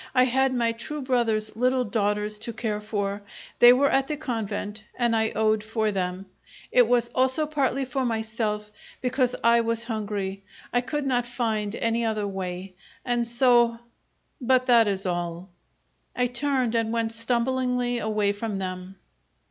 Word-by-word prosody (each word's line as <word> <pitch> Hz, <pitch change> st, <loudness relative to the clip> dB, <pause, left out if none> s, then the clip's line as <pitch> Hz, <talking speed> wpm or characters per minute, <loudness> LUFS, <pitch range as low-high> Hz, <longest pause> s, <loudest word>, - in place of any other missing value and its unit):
I 255 Hz, -, +6 dB
had 265 Hz, +1 st, +2 dB
my 235 Hz, -2 st, +1 dB
true 295 Hz, +6 st, -6 dB
brother's 225 Hz, -5 st, 0 dB
little 255 Hz, +2 st, +2 dB
daughters 210 Hz, -1 st, -1 dB
to 230 Hz, +2 st, -5 dB
care 215 Hz, -2 st, -3 dB
for. 205 Hz, -1 st, -3 dB, 0.4 s
They 240 Hz, -, +9 dB
were 275 Hz, +3 st, +4 dB
at 270 Hz, 0 st, +2 dB
the 300 Hz, -, -3 dB
convent, 215 Hz, -6 st, -4 dB
and 235 Hz, -2 st, +1 dB
I 220 Hz, 0 st, +2 dB
owed 215 Hz, -1 st, +2 dB
for 220 Hz, 0 st, -1 dB
them. 185 Hz, -1 st, -3 dB, 0.5 s
It 245 Hz, -2 st, +5 dB
was 240 Hz, 0 st, +2 dB
also 260 Hz, +4 st, +1 dB
partly 275 Hz, -3 st, 0 dB
for 265 Hz, +1 st, -2 dB
myself, 220 Hz, -2 st, -2 dB, 0.3 s
because 250 Hz, 0 st, 0 dB
I 235 Hz, 0 st, +5 dB
was 230 Hz, 0 st, -1 dB
hungry. 205 Hz, -4 st, -3 dB, 0.3 s
I 245 Hz, -, +3 dB
could 285 Hz, +4 st, -3 dB, 0.2 s
find 220 Hz, -4 st, -2 dB
not -, -, -6 dB
any 230 Hz, +1 st, +1 dB
other 215 Hz, -2 st, -1 dB
way, 185 Hz, -1 st, -5 dB, 0.3 s
and 240 Hz, -1 st, 0 dB
so 240 Hz, -1 st, +4 dB, 0.6 s
but 255 Hz, 0 st, +3 dB
that 235 Hz, -3 st, +5 dB
is 195 Hz, -1 st, -1 dB
all." 175 Hz, 0 st, -3 dB, 0.6 s
I 250 Hz, -, +2 dB
turned 250 Hz, -1 st, 0 dB
and 225 Hz, -1 st, 0 dB
went 230 Hz, -1 st, 0 dB
stumblingly 245 Hz, +1 st, 0 dB
away 210 Hz, -2 st, +1 dB
from 210 Hz, 0 st, -4 dB
them. 185 Hz, 0 st, -5 dB
230 Hz, 155 wpm, -25 LUFS, 210-250 Hz, 0.6 s, They